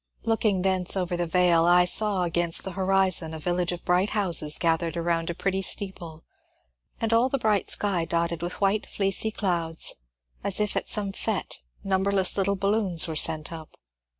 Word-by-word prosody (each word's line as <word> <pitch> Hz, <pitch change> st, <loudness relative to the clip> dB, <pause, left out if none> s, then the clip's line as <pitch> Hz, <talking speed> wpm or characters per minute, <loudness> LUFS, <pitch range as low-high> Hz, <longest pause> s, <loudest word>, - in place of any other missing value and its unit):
Looking 215 Hz, -4 st, 0 dB
thence 190 Hz, 0 st, +1 dB
over 180 Hz, -1 st, -1 dB
the 175 Hz, 0 st, -2 dB
vale, 170 Hz, -1 st, +3 dB
I 175 Hz, +1 st, +5 dB
saw 200 Hz, 0 st, +1 dB
against 170 Hz, -1 st, +2 dB
the 190 Hz, -, -5 dB
horizon 185 Hz, -3 st, +1 dB
a -, -, -7 dB
village 175 Hz, +2 st, -1 dB
of 175 Hz, 0 st, -7 dB
bright 180 Hz, +3 st, +2 dB
houses 170 Hz, -6 st, +3 dB
gathered 165 Hz, -1 st, 0 dB
around 170 Hz, 0 st, -1 dB
a 170 Hz, -, -3 dB
pretty 195 Hz, +1 st, -1 dB
steeple 175 Hz, -5 st, -3 dB, 0.8 s
and 225 Hz, 0 st, -1 dB
all 235 Hz, +3 st, +3 dB
the 275 Hz, -, 0 dB
bright 215 Hz, -5 st, 0 dB
sky 190 Hz, -5 st, 0 dB
dotted 170 Hz, 0 st, -2 dB
with 175 Hz, +1 st, -3 dB
white 200 Hz, +2 st, 0 dB
fleecy 195 Hz, +2 st, 0 dB
clouds, 170 Hz, -6 st, -2 dB, 0.5 s
as 200 Hz, 0 st, -1 dB
if 210 Hz, -1 st, -1 dB
at -, -, -2 dB
some 205 Hz, -2 st, +2 dB
fete -, -, -4 dB, 0.2 s
numberless 190 Hz, 0 st, +1 dB
little 200 Hz, 0 st, 0 dB
balloons 195 Hz, -4 st, +1 dB
were 160 Hz, -, -5 dB
sent 155 Hz, 0 st, 0 dB
up. 160 Hz, -1 st, -11 dB
180 Hz, 175 wpm, -25 LUFS, 170-200 Hz, 0.8 s, I